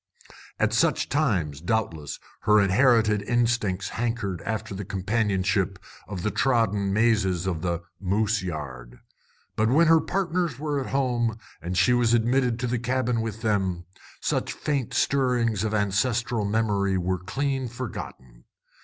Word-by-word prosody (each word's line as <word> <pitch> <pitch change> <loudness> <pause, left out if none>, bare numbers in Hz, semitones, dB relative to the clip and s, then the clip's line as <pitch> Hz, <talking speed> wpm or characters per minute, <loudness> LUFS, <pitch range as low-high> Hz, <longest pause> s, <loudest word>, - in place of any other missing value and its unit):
At - - +1
such - - +2
times, 90 - 0
doubtless, 85 -7 -2 0.2
her 105 0 +4
inherited 105 +1 +4
instincts 115 -4 0
hankered 115 -7 -2
after 110 0 -4
the 100 +1 -5
companionship 95 -1 0 0.3
of 95 -4 -5
the 105 - 0
trodden 105 -6 +1
mazes 100 -5 +2
of 85 -4 -2
the 85 -1 -2 0.2
"moose 105 +2 +1
yard." 65 -8 -6 0.6
But 110 +1 +2
when 155 +7 +5
her 165 0 +5
partners 175 -6 -1
were 145 0 -2
at 130 - -5
home, 120 -5 0 0.2
and 90 +1 -3
she 125 - +4
was 120 -1 +3
admitted 120 +1 +2
to - - 0
the 120 0 -1
cabin 125 -1 0
with 110 -1 -5
them, 95 -5 0 0.4
such - - -1
faint 140 -6 -2
stirrings 120 -6 +1
of 110 - -1
ancestral 110 +2 0
memory 100 -2 +1
were 90 0 -1
clean 135 +7 -2
forgotten. 90 - -8
110 Hz, 140 wpm, -25 LUFS, 95-120 Hz, 0.6 s, when